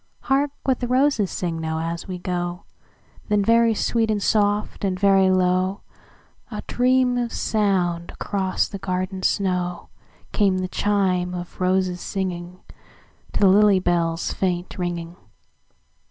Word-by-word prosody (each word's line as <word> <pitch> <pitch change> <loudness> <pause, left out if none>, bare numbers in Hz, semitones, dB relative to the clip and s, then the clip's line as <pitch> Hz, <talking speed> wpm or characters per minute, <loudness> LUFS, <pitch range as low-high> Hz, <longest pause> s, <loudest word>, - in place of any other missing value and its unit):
"Hark 275 +2 +1
what 265 -2 +1
the 245 - -2
roses 255 -5 +2
sing 170 -2 -3
now, 160 0 -2
as 165 +1 -4
we 185 -1 -4
go;"Then 180 +3 -4
very 230 0 +4
sweet 225 +1 0
and 215 -1 +1
soft, 205 0 0
and 185 -2 -1
very 195 -1 +4
low,—A 185 +1 -3
dream 250 0 +2
of 240 -1 -2
sound 180 -5 0
across 190 -2 -1
the 200 - -7
garden 185 0 -3
snow,—Came 185 +1 -1
the 185 0 -2
chime 185 -2 0
of 175 +1 -8
roses 185 -1 +1
singingTo 180 -2 -4 0.7
the 200 - +4
lily 200 0 +5
bell's 170 -2 0
faint 180 -2 -2
ringing. 175 -1 -4
185 Hz, 125 wpm, -23 LUFS, 180-205 Hz, 0.7 s, lily